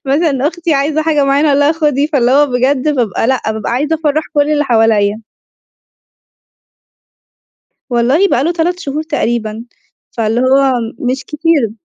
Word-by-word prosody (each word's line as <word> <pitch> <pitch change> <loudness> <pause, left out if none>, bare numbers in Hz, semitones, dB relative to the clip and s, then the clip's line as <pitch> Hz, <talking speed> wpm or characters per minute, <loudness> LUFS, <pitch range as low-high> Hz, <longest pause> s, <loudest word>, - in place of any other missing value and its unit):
مثلًا 280 0 +1
أختي 335 -2 -2
عايزة 295 +3 0
حاجة 305 -3 +1
معيّنة 280 +2 +2
أقول 285 0 +2
لها 290 +2 +3
خدي، 295 -3 0
فاللي 265 -6 +1
هو 290 +2 +4
بجد 260 +2 0
بابقى 230 -5 -1
لأ 260 0 +1
بابقى 220 0 -4
عايزة 290 +6 0
أفرّح 310 -1 -1
كلّ 290 0 +2
اللي 295 -1 +1
حواليّا. 220 -4 +2 2.7
والله 255 +10 +2
بقى 265 -7 +1
له 335 - +1
3 350 +1 -1
شهور 300 0 -4
تقريبًا، 235 -7 -3 0.5
فاللي 225 +1 -1
هو 265 +1 +3 0.3
مش 255 +2 -2
كتير. 300 -7 0
280 Hz, 145 wpm, -14 LUFS, 245-305 Hz, 2.7 s, هو